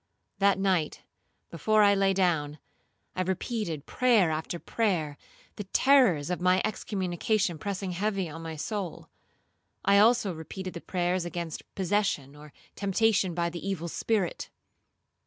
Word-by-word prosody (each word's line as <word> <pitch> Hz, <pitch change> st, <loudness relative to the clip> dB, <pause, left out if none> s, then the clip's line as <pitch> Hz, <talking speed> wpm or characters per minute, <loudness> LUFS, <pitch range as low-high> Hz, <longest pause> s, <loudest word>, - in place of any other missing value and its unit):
That 200 Hz, -1 st, +4 dB
night, 185 Hz, -5 st, 0 dB, 0.5 s
before 215 Hz, +6 st, +3 dB
I 200 Hz, 0 st, +6 dB
lay 195 Hz, -1 st, +3 dB
down, 165 Hz, -6 st, +1 dB, 0.6 s
I 185 Hz, -, -1 dB
repeated 185 Hz, -, -3 dB
prayer 230 Hz, -10 st, +3 dB
after 160 Hz, +2 st, -3 dB
prayer, 170 Hz, -8 st, -1 dB, 0.4 s
the 205 Hz, -, -5 dB
terrors 195 Hz, -, +4 dB
of 180 Hz, -, -2 dB
my 180 Hz, +1 st, +4 dB
excommunication 195 Hz, -2 st, -1 dB
pressing 195 Hz, +1 st, -3 dB
heavy 195 Hz, 0 st, -1 dB
on 160 Hz, +1 st, -8 dB
my 165 Hz, -1 st, -6 dB
soul. 185 Hz, +3 st, -5 dB, 0.8 s
I 200 Hz, 0 st, +5 dB
also 220 Hz, -3 st, +4 dB
repeated 180 Hz, +4 st, -7 dB
the 170 Hz, -, -7 dB
prayers 180 Hz, 0 st, -1 dB
against 170 Hz, -2 st, -5 dB
possession 190 Hz, -8 st, 0 dB
or 150 Hz, 0 st, -13 dB, 0.2 s
temptation 200 Hz, -2 st, +1 dB
by 170 Hz, -1 st, 0 dB
the 170 Hz, -, -7 dB
evil 190 Hz, -4 st, -3 dB
spirit. 195 Hz, +1 st, -1 dB
185 Hz, 135 wpm, -28 LUFS, 170-205 Hz, 0.8 s, I